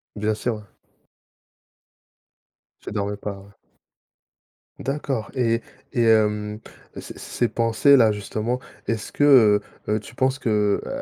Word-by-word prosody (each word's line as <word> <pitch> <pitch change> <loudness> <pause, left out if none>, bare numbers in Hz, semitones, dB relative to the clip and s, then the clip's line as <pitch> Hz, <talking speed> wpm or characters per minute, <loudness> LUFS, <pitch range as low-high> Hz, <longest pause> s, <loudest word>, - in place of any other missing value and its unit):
Bien 105 +1 0
sûr. 120 +3 -2
Ouais. 105 - -9 2.2
Tu - - -7
dormais 100 -1 -2
pas. 100 -1 -6
Ouais. 100 +1 -15 1.3
D'accord 135 -5 -3
et 115 -2 +1 0.3
et 120 -2 +2
hem, 105 -1 +2 0.3
c - - -7
ces - - -10
ces 120 - -1
pensées-là, 115 0 +4
justement, 110 +4 -3 0.3
est-ce 115 -2 -3
que, 145 - +1 0.6
heu - - +1
heu, 110 - 0
tu 110 +4 -13
penses 130 +2 +1
que 105 -4 +1
heu, - - -5
110 Hz, 130 wpm, -23 LUFS, 105-120 Hz, 2.2 s, pensées-là